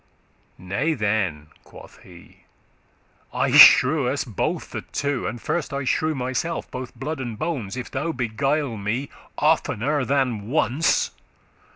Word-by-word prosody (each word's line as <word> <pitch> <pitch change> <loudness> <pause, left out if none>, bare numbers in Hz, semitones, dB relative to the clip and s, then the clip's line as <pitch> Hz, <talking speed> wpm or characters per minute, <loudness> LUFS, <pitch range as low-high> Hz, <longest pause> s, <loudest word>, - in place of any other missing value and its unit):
"Nay 120 - -1
then," 100 - -1
quoth - - -15
he, 85 -2 -17 0.9
"I - - 0
shrew* 135 +1 +8
us 140 +2 -1
both 110 -7 -3
the - - -4
two, 145 -2 -2
*curse - - 0
And 120 +2 -7
first 165 +4 -3
I 140 0 -2
shrew 155 +4 0
myself, 130 +6 -3
both 125 -1 -7
blood 145 +5 -5
and 120 -4 -5
bones, 130 - -3
If 125 - -6
thou 150 +5 -2
beguile 130 +1 -1
me 115 +7 -3 0.3
oftener 145 -2 +1
than 125 -6 -1
once. 145 +2 +1
130 Hz, 140 wpm, -23 LUFS, 110-145 Hz, 0.9 s, shrew